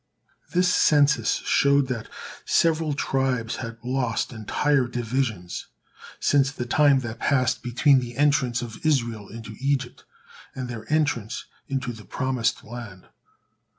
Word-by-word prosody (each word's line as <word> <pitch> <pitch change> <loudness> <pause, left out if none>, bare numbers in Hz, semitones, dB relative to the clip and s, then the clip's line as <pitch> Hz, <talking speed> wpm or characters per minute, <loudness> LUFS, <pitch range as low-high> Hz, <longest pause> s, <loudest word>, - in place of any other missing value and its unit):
This 180 +1 +3
census 150 -1 +3
showed 140 -1 +3
that 115 -4 -4 0.3
several 160 -3 +2
tribes 130 -5 -1
had 115 -2 -6
lost 125 -3 -1
entire 130 +4 +1
divisions 115 -6 -3 0.5
since 140 -1 +3
the 125 -4 -5
time 140 +1 +4
that 115 -2 -6
passed 130 -3 +1
between 130 +3 +4
the 120 -1 -7
entrance 135 -4 +2
of 120 +5 -9
Israel 120 -9 0
into 115 0 -9
Egypt, 135 -2 -1 0.5
and 130 -1 -4
their 115 -1 -7
entrance 145 -8 0 0.2
into 130 -3 -2
the 110 -2 -11
promised 130 -3 -1
land. 110 -5 -9
125 Hz, 125 wpm, -25 LUFS, 115-140 Hz, 0.5 s, time